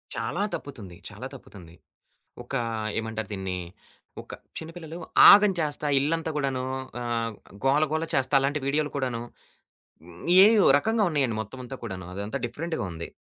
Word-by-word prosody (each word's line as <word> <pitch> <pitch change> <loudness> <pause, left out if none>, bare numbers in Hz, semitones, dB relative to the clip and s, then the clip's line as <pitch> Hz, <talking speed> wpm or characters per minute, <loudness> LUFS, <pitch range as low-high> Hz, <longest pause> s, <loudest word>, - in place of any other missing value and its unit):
చాలా - - -2
తప్పుతుంది. 110 -11 -7
చాలా - - -8
తప్పుతుంది. 85 -4 -13 0.7
ఒక 120 - -12 0.5
ఏమంటారు 110 -1 -5
దీన్ని 95 -2 -3 0.6
ఒక - - -11 0.2
చిన్న 160 0 -7
పిల్లలు 165 -1 -8 0.3
ఆగం 205 0 +7
చేస్తా 150 -1 -2
ఇల్లంతా 160 +3 -1
కూడాను 135 -3 -1 0.4
ఆహ్, 115 -1 -1 0.3
గోల, 140 +3 +4
గోల 160 +1 0
చేస్తా 135 +1 +1
అలాంటి 140 +2 0
వీడియోలు 145 +2 0
కూడాను 125 -4 -2 1.2
ఏయో, 215 -1 +5
రకంగా 220 +7 0
ఉన్నాయండి 135 -7 0
మొత్తమంతా 125 +4 -9
కూడాను. 95 -6 -6
అదంతా 100 +6 -4
డిఫరెంట్‍గా 160 +8 -4
ఉంది. 85 0 -7
135 Hz, 130 wpm, -26 LUFS, 110-155 Hz, 1.2 s, ఆగం